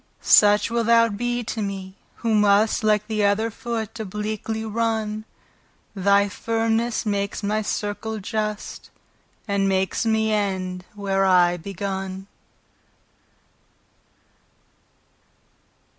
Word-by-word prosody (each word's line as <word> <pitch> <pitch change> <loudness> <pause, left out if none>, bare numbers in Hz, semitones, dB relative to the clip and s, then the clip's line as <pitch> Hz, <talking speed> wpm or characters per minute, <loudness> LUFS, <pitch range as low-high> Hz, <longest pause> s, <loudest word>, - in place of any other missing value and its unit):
Such 210 +2 +5
wilt 235 -1 0
thou 230 0 +5
be 240 +3 -2
to 220 0 -4
mee, 195 -2 -5 0.2
who 230 -2 -1
must 210 +1 +3
Like 210 -1 +2
th' 220 -2 -2
other 205 +3 +2
foot, 230 -1 -5
obliquely 215 +2 -4
runne; 220 -1 -2 0.7
Thy 200 0 +3
firmnes 225 +2 -1
drawes 200 -1 -2
my 210 +2 0
circle 215 +1 -3
just, 215 0 -4 0.6
And 200 -1 +1
makes 190 0 0
me 220 -1 +1
end, 185 -3 -2
where 195 -1 0
I 180 -2 +4
begunne. 190 +1 -5
210 Hz, 100 wpm, -23 LUFS, 200-220 Hz, 0.7 s, Such